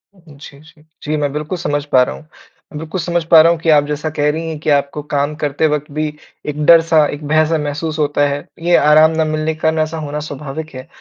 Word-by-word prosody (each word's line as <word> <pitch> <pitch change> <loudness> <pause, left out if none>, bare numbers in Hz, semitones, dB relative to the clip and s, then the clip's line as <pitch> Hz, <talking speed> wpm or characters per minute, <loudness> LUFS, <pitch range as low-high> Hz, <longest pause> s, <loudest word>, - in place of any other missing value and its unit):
जी, 150 -5 -15
जी। 155 +1 -20 0.2
जी, 155 +1 -2
मैं 145 -1 -1
बिल्कुल 150 +5 -4
समझ 145 -4 -2
पा 130 -3 +3
रहा - - -4
हूँ। 155 - -15 0.5
बिल्कुल 160 +4 -5
समझ 170 0 -1
पा 165 - +9
रहा 165 +1 +5
हूँ 170 - -1
कि 165 - -1
आप 150 -2 +5
जैसा 150 +1 -3
कह 150 -1 0
रही 165 +2 -5
हैं 160 - -5
कि 155 - -3
आपको 140 0 0
काम 145 +1 0
करते 145 +2 +1
वक़्त 150 -1 -3
भी 155 +1 -2 0.4
एक 150 +1 -3
डर-सा 165 -2 +5
एक 145 +1 -8
भय-सा 155 +2 +2
महसूस 150 +1 -4
होता 145 -1 +1
है। 140 0 -4 0.2
ये 175 0 +3
आराम 155 +2 +5
ना 160 - +2
मिलने 155 +1 -1
के 155 - -15
कारण 160 0 0
ऐसा 155 +1 -2
होना 150 -1 -5
स्वाभाविक 150 +2 -7
है। 130 0 -9
155 Hz, 235 wpm, -16 LUFS, 145-160 Hz, 0.5 s, पा